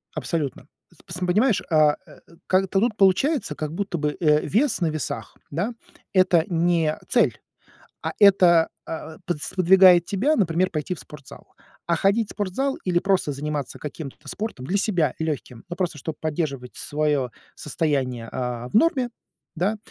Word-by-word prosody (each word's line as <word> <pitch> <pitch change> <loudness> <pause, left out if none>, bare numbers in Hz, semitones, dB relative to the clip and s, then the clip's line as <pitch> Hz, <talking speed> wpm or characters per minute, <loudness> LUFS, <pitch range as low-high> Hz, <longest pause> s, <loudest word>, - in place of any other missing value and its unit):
Абсолютно. 145 -5 -3 0.3
П - - -22
пс 175 -2 -7
понимаешь, 215 +5 +3
а, 155 -3 +4
э, 150 - -15 0.3
как-то 190 +1 +2
тут 225 +1 0
получается, 200 - +2
как 155 0 -4
будто 195 0 -3
бы, 150 0 -1
э, 150 -3 +4
вес 230 - +1
на 170 - +2
весах, 155 -1 -5
да, 185 +11 -2 0.4
это 180 -3 +4
не 170 -2 +1
цель, - - +2 0.6
а - - -2
это, 180 -5 +6 0.2
а, 160 0 -7
подс 175 -6 -3
сподвигает 185 -1 +6
тебя, 240 - +1
например, 185 - +1
пойти 155 +3 -3
в 175 - -10
спортзал. 140 -3 -13 0.4
А 170 - +2
ходить 200 +6 +2
в - - -7
спортзал 225 +8 -1
или 175 -2 +2
просто 190 -5 +1
заниматься 145 -1 -4
каким-то 145 -1 -7
спортом 210 - -5
для 195 - +1
себя, 175 - +1
легким, 145 -7 -4
ну 175 - -6
просто 175 -4 -2
чтоб 155 +3 -5
поддерживать 145 -5 -3
свое 145 -4 -1 0.2
состояние, 135 -7 -2
а, 125 -1 -4
в - - -7
норме, 260 -2 +3 0.5
да, 195 +6 0
170 Hz, 155 wpm, -24 LUFS, 150-195 Hz, 0.6 s, это